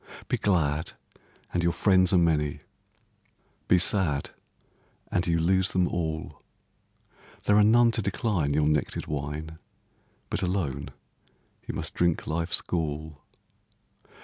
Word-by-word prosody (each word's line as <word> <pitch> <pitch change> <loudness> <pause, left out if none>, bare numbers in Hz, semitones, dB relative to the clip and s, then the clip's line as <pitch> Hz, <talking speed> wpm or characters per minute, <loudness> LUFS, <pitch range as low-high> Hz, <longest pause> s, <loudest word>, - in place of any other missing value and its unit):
Be - - 0
glad, 80 -6 0 0.6
and 90 - +1
your 85 0 +2
friends 95 -3 +3
are 95 - +4
many; 75 -4 +1 1.1
Be 90 - +5
sad, 85 -6 +1 0.8
and 90 0 0
you 85 -1 +2
lose 95 +3 +1
them 90 -1 +2
all; 80 -2 -4 1.0
There 105 - +3
are 105 - +6
none 115 +2 +5
to 115 - 0
decline 95 - 0
your 75 0 +2
nectar'd 75 -2 0
wine, 75 +2 -5 0.7
But - - -1
alone 90 -7 -2 0.8
you - - -4
must - - -3
drink 85 -2 +1
life's 85 +2 0
gall. 75 -3 -4
85 Hz, 120 wpm, -27 LUFS, 75-95 Hz, 1.1 s, are